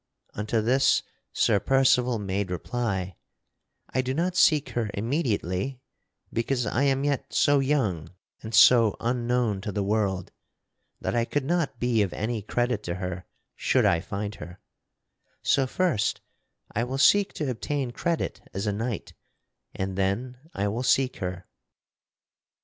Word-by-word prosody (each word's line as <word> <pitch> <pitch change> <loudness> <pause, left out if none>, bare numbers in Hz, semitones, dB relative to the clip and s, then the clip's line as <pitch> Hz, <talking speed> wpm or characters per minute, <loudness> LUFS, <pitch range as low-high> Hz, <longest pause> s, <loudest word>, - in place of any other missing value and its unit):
Unto 105 +2 -1
this 130 +5 +3 0.3
Sir 105 -3 +2
Percival 125 -1 +3
made 100 -1 -2
reply: 95 -1 -3 0.8
"I 130 - +2
do 130 +1 -3
not 175 +3 0
seek 150 -5 +4
her 115 -3 -2
immediately 115 - -1 0.5
because 125 +1 0
I 125 +6 +1
am 135 0 +2
yet 145 -2 -1
so 145 -1 +4
young 115 - 0 0.3
and 110 0 -4
so 115 -4 +6
unknown 120 -3 0
to 105 0 -4
the 100 +1 -1
world 100 -3 -1 0.7
that - - -2
I 120 -1 +2
could 135 +3 -2
not 160 -5 -1
be 120 -3 +2
of 100 -3 0
any 110 0 -2
credit 120 +1 -1
to 85 - -2
her 90 -1 -5 0.3
should - - +2
I 85 - +4
find 100 +3 -4
her; 85 +1 -9 0.8
so 135 -2 +3
first 155 - 0 0.5
I 115 - 0
will 130 +2 -3
seek 200 +8 +5
to 145 -4 -2
obtain 130 +1 -2
credit 170 +6 -2
as 100 +2 -2
a 105 - 0
knight, 115 0 -4 0.6
and 95 0 -3
then 120 +7 -1 0.2
I 100 +1 0
will 115 +4 -2
seek 130 +1 +2
her." 90 -1 -5
120 Hz, 145 wpm, -26 LUFS, 100-135 Hz, 0.8 s, so